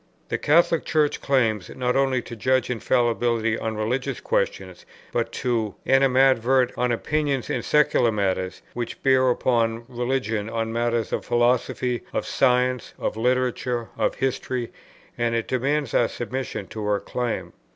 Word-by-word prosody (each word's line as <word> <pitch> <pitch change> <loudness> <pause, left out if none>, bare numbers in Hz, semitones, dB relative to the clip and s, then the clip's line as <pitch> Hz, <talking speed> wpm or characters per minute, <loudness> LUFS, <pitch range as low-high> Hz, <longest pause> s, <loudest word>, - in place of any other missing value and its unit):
The - - -1
Catholic 165 +1 +3
Church 150 -2 +1
claims, 110 -8 +1
not 125 -1 0
only 135 -2 +2
to 120 - -8
judge 130 +3 +1
infallibly 120 -2 +1
on 110 -1 -3
religious 125 +5 -2
questions, - - -2 0.3
but 115 -1 -1
to 115 -5 -1
animadvert 130 -1 +4
on 125 0 0
opinions 140 +1 -1
in - - -1
secular 145 -5 +3
matters 95 -3 -2
which 120 -1 -5
bear 130 -1 +4
upon 115 -2 +1
religion, 120 -4 -2
on 115 0 -2
matters 115 -1 0
of - - -1
philosophy, 120 0 +1
of - - -1
science, 125 -1 +1
of - - -2
literature, 125 0 0
of - - 0
history, 130 -2 -2 0.5
and 120 -1 +1
it 115 - -1
demands 140 +4 0
our 120 - +3
submission 120 -4 -4
to 110 - -6
her 105 -1 +1
claim. 120 +3 -3
125 Hz, 140 wpm, -24 LUFS, 115-130 Hz, 0.5 s, animadvert